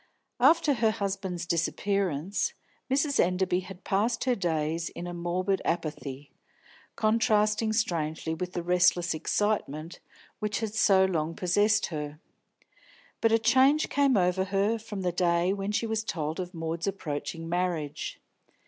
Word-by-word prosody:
After 325 -3 +5
her 230 -3 +2
husband's 195 -4 -3
disappearance, 180 0 -1 0.3
Mrs. 280 +2 +1
Enderby 180 0 +2
had 185 0 -10
passed 220 +4 0
her 255 - +2
days 165 -5 -1
in 175 - -7
a 175 - -5
morbid 180 +3 -1
apathy, 145 -4 -3 0.6
contrasting 215 -1 +2
strangely 160 -7 -1
with 180 +2 -5
the 175 - -3
restless 180 0 +3
excitement 165 -3 -1 0.4
which 210 -1 -1
had 220 -2 -3
so 195 -3 +4
long 165 -3 -1
possessed 205 +4 +2
her. 150 -1 -4 1.0
But 225 - +3
a 225 - +6
change 260 +7 +4
came 275 -4 +3
over 180 0 +2
her 200 +4 +1
from 210 -3 -6
the 180 -1 0
day 175 +1 +2
when 200 0 -3
she 220 +2 0
was 220 -1 -1
told 160 -4 -3
of 180 -1 -4
Maud's 165 0 -4
approaching 165 -3 -4
marriage. 165 -4 -2
185 Hz, 140 wpm, -28 LUFS, 170-215 Hz, 1.0 s, a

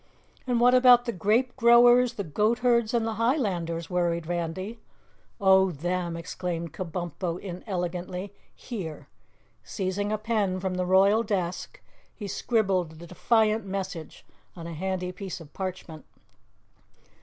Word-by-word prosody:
"And 245 -2 +1
what 245 +1 +5
about 250 -1 +6
the 235 - -1
Grape 225 +7 +1
Growers, 240 0 +6
the 205 - -4
Goatherds 235 - +1
and 230 -2 0
Highlanders?" 205 - -1
worried 170 -2 -1
Randy. 175 +6 -4 0.6
"Oh, 190 -1 +5
them!" 175 +1 -3
exclaimed 170 -1 -5
Kabumpo 175 0 -4
inelegantly. 180 0 -5 0.2
"Here!" 185 -11 -7 0.6
Seizing 200 +1 -3
a 215 - 0
pen 210 -4 -1
from 185 0 -2
the 180 0 -2
royal 195 +4 +5
desk, 190 -5 -3 0.4
he 210 - -6
scribbled 190 -6 0
a 170 - -9
defiant 220 +4 +1
message 190 -4 -6 0.3
on 170 -2 -8
a 170 - -6
handy 180 +2 -3
piece 185 0 -7
of 155 -3 -14
parchment. 185 -5 -6
190 Hz, 125 wpm, -27 LUFS, 175-225 Hz, 0.6 s, about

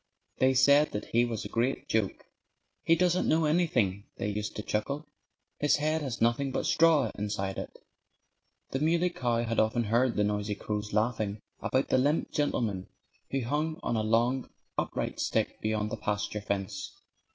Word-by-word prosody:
They 130 0 +4
said 140 +3 +5
that 105 - -4
he 120 +1 +3
was 115 -4 -4
a - - -2
great 120 +5 -1
joke. 110 -4 -1 0.6
"He 165 - +4
doesn't 180 +1 +2
know 160 0 +3
anything," 120 - +1
they 105 - -2
used 105 0 -3
to 105 - -4
chuckle. 140 +10 -2 0.5
"His 145 -2 +4
head 155 +2 0
has 130 -5 -4
nothing 120 +4 +2
but - - -1
straw 165 -2 +4
inside 100 -2 -3
it." - - -7 0.9
The 135 - -1
Muley 170 +4 +2
Cow 120 -6 0
had 115 -1 -1
often 110 +2 +2
heard 115 +3 +2
the 105 - +2
noisy 105 0 -1
crows 105 0 -4
laughing 110 -1 0 0.2
about 130 +1 0
the 130 - +4
limp 145 +5 +1
gentleman 110 -10 -1 0.4
who 135 -2 -1
hung 150 +6 -1
on - - 0
a 110 - +1
long, 120 +4 +1 0.3
upright - - -2
stick - - -1
beyond 105 -1 -1
the - - -3
pasture 105 0 -2
fence. 100 - -4
120 Hz, 170 wpm, -29 LUFS, 105-145 Hz, 0.9 s, said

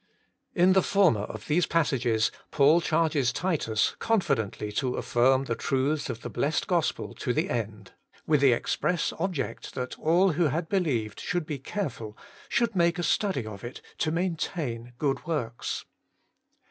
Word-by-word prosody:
IN 185 0 +5
the 190 - +5
former 175 - +3
of - - -8
these 165 +3 +2
passages 125 -9 +1 0.2
Paul 150 +5 +5
charges 155 -6 +1
Titus 145 -11 0
confidently 110 - 0
to 125 +4 -1
affirm 130 +2 +2
the 120 - -2
truths 140 +5 0
of 115 -3 -5
the - - -4
blessed - - 0
Gospel - - -1
to - - -2
the - - 0
end. 105 -5 -4 0.3
with 150 -2 +3
the 135 -2 +6
express 165 +7 0
object 180 -5 -3
that 125 0 -4
all 180 +4 +4
who 165 +2 +1
had 160 +3 -1
believed 130 - -1
should 175 -2 -2
be 150 -2 -4
careful, 125 - -5 0.3
should 230 -3 +1
make 170 -1 +3
a 175 - -2
study 190 - +1
of 105 -2 -8
it, 120 +2 -8 0.2
to 155 - +1
maintain 155 -8 -2
good 140 -1 +1
zvorks. 120 -8 -3
145 Hz, 155 wpm, -27 LUFS, 120-175 Hz, 0.3 s, the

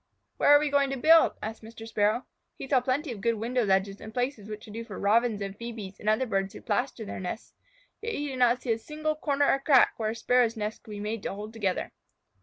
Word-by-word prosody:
"Where - - +3
are 290 - +10
we 295 0 0
going 280 -1 +3
to 270 - -3
build?" 320 +5 +6
asked 220 +1 -5
Mr. 225 0 -10
Sparrow. 215 +2 +1 0.3
He - - -7
saw 265 -2 +3
plenty 260 +3 -1
of 210 -4 -7
good 230 +1 +1
window 240 +3 -1
ledges 195 0 +1
and 220 - -8
places 245 -3 -3
which 210 0 -7
would 210 - -11
do 230 +1 -5
for 215 -4 -9
Robins 215 0 +2
and 195 0 -5
Phœbes 220 -4 -7
and 210 - -1
other 215 +5 +2
birds 195 -3 -1
who - - -9
plaster 245 -3 -1
their - - -6
nests. 185 +4 -6 0.5
Yet 455 +1 -3
he 290 0 -3
did 260 -1 -5
not 245 0 +3
see 245 - 0
a 225 - -4
single 310 +5 -3
corner 290 -2 0
or 275 - +3
big 275 - -25
crack 270 -5 +6
where 220 -1 -1
a 220 - -3
Sparrow's 235 0 +2
nest 215 0 -4
could - - -17
be 205 -1 -6
made 210 +1 -3
to 195 - -4
hold 210 +2 -7
together. 200 -5 -2
230 Hz, 255 wpm, -28 LUFS, 210-265 Hz, 0.5 s, are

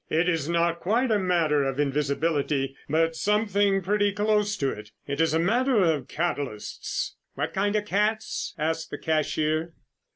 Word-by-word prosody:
"It 165 +3 +2
is 165 -3 0
not 170 0 +1
quite 230 +7 +1
a 210 - +3
matter 165 -6 +2
of 135 0 -2
invisibility, 140 -1 0
but 165 +2 +2
something 205 0 +1
pretty 205 +2 +2
close 210 0 +1
to 140 -7 0
it. 105 0 -9 0.2
It 140 +2 -2
is 165 - +3
a - - +4
matter 225 +5 +2
of 155 -6 +1
catalysts." 140 -10 -3 0.2
"What - - -3
kind 205 +2 0
of 210 -1 0
cats?" 210 +2 -1
asked 160 +1 -2
the - - -5
cashier. 155 +1 0
170 Hz, 160 wpm, -26 LUFS, 150-205 Hz, 0.2 s, a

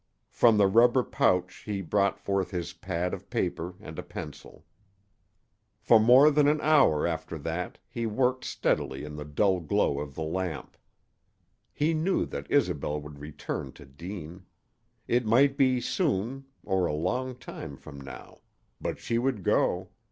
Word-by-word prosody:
From 115 -3 +4
the 100 - +5
rubber 120 +5 +5
pouch 90 -5 +1
he 105 -2 -2
brought 100 +3 +1
forth 100 -2 -1
his 90 -2 -4
pad 90 -1 -3
of - - -7
paper 90 +2 -2
and - - -9
a - - -2
pencil. 75 -1 -9 1.1
For 115 - +5
more 125 +7 +7
than 145 0 +4
an 150 +1 +3
hour 145 - +4
after 80 -1 -3
that 80 +4 -4
he 115 -1 -3
worked. 130 +3 0
steadily 65 +2 -1
in 75 0 -7
the 75 - -6
dull 95 +6 +1
glow 75 -3 +1
of 70 -1 -6
the 80 - -3
lamp. 90 +1 -4 1.0
He 155 +3 +1
knew 165 +4 +1
that - - -7
Isobel 75 0 +1
would 75 -1 -10
return 70 -2 -6
to - - -14
Deane. 85 +5 -9 0.6
It 120 +1 +2
might 135 +5 +4
be 130 -3 +3
soon 135 - -1 0.2
or 95 -2 +1
a - - -2
long 125 +11 -2
time 80 - -9
from 70 -3 -11
now. 70 -1 -11 0.4
But - - -3
she 115 - -1
would 120 -6 -1
go. - - +1
95 Hz, 160 wpm, -28 LUFS, 80-125 Hz, 1.1 s, more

